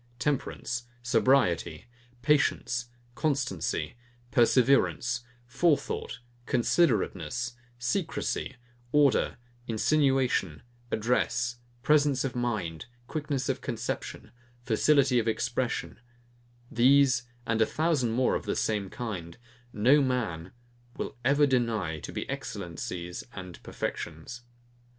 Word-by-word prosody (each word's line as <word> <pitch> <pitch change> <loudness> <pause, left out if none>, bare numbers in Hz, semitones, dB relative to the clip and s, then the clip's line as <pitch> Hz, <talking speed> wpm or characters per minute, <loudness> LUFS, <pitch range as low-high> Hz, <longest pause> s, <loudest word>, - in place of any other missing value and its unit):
TEMPERANCE, 120 -2 -2 0.2
SOBRIETY, 125 -6 +2 0.4
PATIENCE, 130 -4 +2 0.3
CONSTANCY, 135 - -1 0.4
PERSEVERANCE, 125 0 +3 0.3
FORETHOUGHT, 150 +5 0 0.3
CONSIDERATENESS, 120 - +1 0.2
SECRECY, 135 0 -2 0.4
ORDER, 145 -2 +3 0.3
INSINUATION, 130 - +1 0.3
ADDRESS, 120 +1 0 0.3
PRESENCE 145 -2 +3
OF 135 -2 -3
MIND, 105 -10 -2 0.2
QUICKNESS 140 -1 -2
OF 135 - -1
CONCEPTION, 120 -3 -4 0.3
FACILITY 130 +2 +3
OF 115 - -2
EXPRESSION, 120 +3 -1 0.7
these, 130 0 +4 0.2
and 110 0 +1
a 110 - +4
thousand 155 -6 +1
more 125 +2 +2
of - - -2
the - - 0
same 105 -3 -1
kind, 90 -9 -6 0.3
no 130 +8 +4
man 105 -11 -1 0.5
will - - -4
ever 140 +3 +4
deny 115 - 0
to - - -7
be - - -4
excellencies 90 -1 -5
and 90 -4 -9
perfections. 85 +10 -5
120 Hz, 95 wpm, -28 LUFS, 110-135 Hz, 0.7 s, these